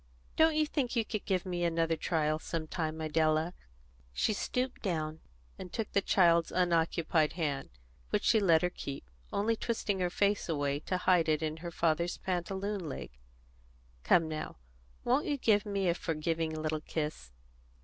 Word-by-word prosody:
"Don't 320 0 +4
you 310 0 +3
think 275 -5 -1
you 230 -2 +2
could 215 -2 -4
give 185 -2 0
me 175 -1 -2
another 165 -1 +1
trial 155 -1 0
some 160 0 -3
time, 160 -1 -3
Idella?" 155 +2 +1 0.6
She 215 - +1
stooped 250 +5 -2
down 160 -5 -2 0.4
and 180 - -7
took 225 -3 -3
the 200 - +3
child's 170 -4 +4
unoccupied 170 -2 +2
hand, 150 -5 -2 0.4
which - - 0
she 220 - +4
let 170 -5 +4
her 180 - +1
keep, 135 - -7 0.2
only 220 +3 +1
twisting 215 -3 -1
her 180 -1 +1
face 200 +1 +1
away 145 -2 0
to 185 +4 -2
hide 180 -3 +3
it 155 0 +1
in 155 0 -2
her 170 +1 -6
father's 170 +1 0
pantaloon 190 0 -3
leg. 135 - -6 0.9
"Come 165 -2 +4
now, 155 - -5 0.5
won't 260 +4 +2
you 290 -2 0
give 215 -4 +2
me 200 -2 0
a 170 - +4
forgiving 160 -1 -2
little 155 0 -1
kiss?" 150 - -4
170 Hz, 165 wpm, -32 LUFS, 155-200 Hz, 0.9 s, Don't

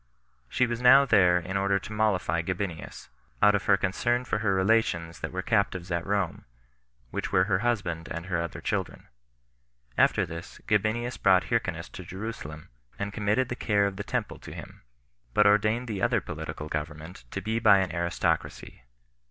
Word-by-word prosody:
She 130 - +2
was 120 0 -3
now 135 +3 +7
there 90 -8 +5
in 95 +3 -3
order 100 0 +2
to 100 +2 -7
mollify 90 -6 +1
Gabinius, 90 -1 -5 0.3
out 105 +7 +6
of 105 0 0
her 100 - +5
concern 120 +6 0
for 105 - -1
her 100 -3 +1
relations 95 -5 +1
that - - -4
were 95 0 -4
captives 95 -5 0
at 85 0 -2
Rome, 100 -3 -1 0.7
which - - -3
were 90 - +4
her 95 -1 +1
husband 95 -8 -1
and 85 0 -5
her 85 -2 -1
other 85 - -5
children. - - -3 0.9
After - - +4
this 85 +1 -9
Gabinius 110 +4 0
brought 95 -1 +5
Hyrcanus 90 -8 -1
to 95 - -9
Jerusalem, 90 -5 -7 0.3
and 100 0 -4
committed 110 +5 0
the 120 - -3
care 105 -4 +1
of 100 -1 -3
the 100 - -4
temple - - -3
to - - -10
him; - - -10 0.5
but 105 - +5
ordained 110 +4 +3
the 105 -4 -4
other - - +2
political 75 - -6
government 75 +3 -6
to - - -4
be 110 +3 -2
by 100 - +6
an 95 -1 -1
aristocracy. 85 0 -2
100 Hz, 175 wpm, -27 LUFS, 85-110 Hz, 0.9 s, now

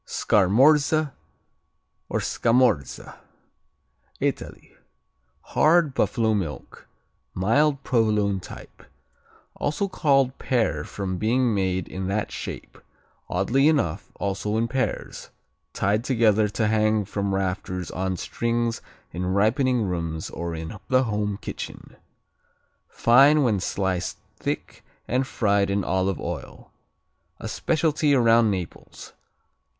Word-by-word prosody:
Scarmorze 140 - +3 1.0
or - - -1
Scamorze 115 - +1 1.2
Italy - - -4 0.7
Hard; 160 -2 +3
buffalo 115 -5 +1
milk; 90 -8 -5 0.5
mild 140 +9 +2
Provolone 105 -5 +1
type. - - -12 0.7
Also 155 +8 -2
called 135 -8 +2
Pear 120 -4 0
from 95 -3 -4
being 120 +2 +2
made 95 -3 -1
in 95 0 -5
that 105 +2 -2
shape, - - -7 0.5
oddly 120 +10 +2
enough 140 - 0
also 100 +2 -2
in 115 +1 +1
pairs, 130 +2 -3 0.4
tied 105 +3 0
together 110 -5 +3
to 105 +2 -1
hang 110 -1 +2
from 100 0 -2
rafters 90 -1 -3
on 95 0 -2
strings 115 +4 -2 0.3
in 90 +2 -3
ripening 115 +6 +2
rooms 85 -4 -3
or 85 0 -4
in 80 +5 -7
the 130 0 +3
home 105 -3 -2
kitchen. - - -8 0.9
Fine 140 +5 +5
when 110 -6 +2
sliced 95 -1 -2 0.2
thick - - -5 0.2
and 130 +2 0
fried 100 -5 +1
in 100 0 0
olive 95 -1 0
oil. - - -7 0.7
A - - -6
specialty 150 +4 +1
around 115 -2 +4
Naples. 90 -4 -6
110 Hz, 105 wpm, -24 LUFS, 95-130 Hz, 1.2 s, Fine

